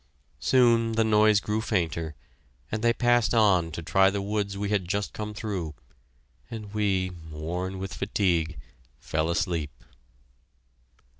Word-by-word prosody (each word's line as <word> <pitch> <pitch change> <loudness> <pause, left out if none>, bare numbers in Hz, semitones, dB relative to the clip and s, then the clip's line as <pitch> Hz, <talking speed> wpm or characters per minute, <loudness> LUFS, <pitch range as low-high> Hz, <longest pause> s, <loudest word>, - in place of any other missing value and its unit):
Soon 115 -3 +3
the 115 0 +3
noise 105 -1 +4
grew 105 +2 -2
fainter, 80 -7 -1 0.6
and 110 - -2
they 120 +1 +4
passed 120 0 +2
on 95 -7 +4
to 85 - -5
try 95 +4 +4
the 100 +1 -2
woods 100 0 -2
we 100 0 -2
had 100 -4 0
just 100 +2 -2
come 105 0 -5
through, 95 -8 -4 0.7
and 110 -3 -7
we, 95 -3 0 0.2
worn 90 +5 -4
with 95 0 -5
fatigue, 85 -6 0 0.4
fell 80 +5 -1
asleep. 85 -4 -2
100 Hz, 135 wpm, -27 LUFS, 85-110 Hz, 0.7 s, noise